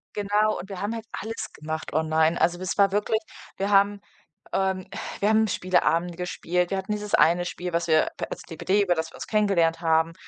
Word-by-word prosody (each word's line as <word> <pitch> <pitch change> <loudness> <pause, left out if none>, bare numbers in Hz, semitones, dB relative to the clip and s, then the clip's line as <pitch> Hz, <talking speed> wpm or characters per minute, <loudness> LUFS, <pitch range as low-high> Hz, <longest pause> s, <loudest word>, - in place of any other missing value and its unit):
Genau. 210 +1 +1
Und 190 - -8
wir 195 -1 -6
haben 210 +3 -2
halt 225 -1 -6
alles 225 +1 -5
gemacht 155 0 -5
online. 160 +1 +2
Also, 175 +1 +2
das 185 +2 -4
war 200 -1 +5
wirklich 210 +2 +1 0.4
wir 195 +1 -1
haben, 200 0 +3 0.5
ähm, 190 -1 0
äh - - -7 0.2
wir 205 - +2
haben 220 0 +4
Spieleabende 175 -2 +1
gespielt. 180 0 -1
Wir 195 - 0
hatten 190 +2 -4
dieses 210 0 -4
eine 170 +4 +4
Spiel, 180 -1 -5
was 170 0 0
wir 155 -1 +4
p - - -2
als - - -6
DPD, 185 +4 0
über 180 -2 +2
das 160 0 -3
wir - - -14
uns - - -7
kennengelernt 195 -7 +2
haben, 160 0 +2
185 Hz, 210 wpm, -25 LUFS, 165-205 Hz, 0.5 s, war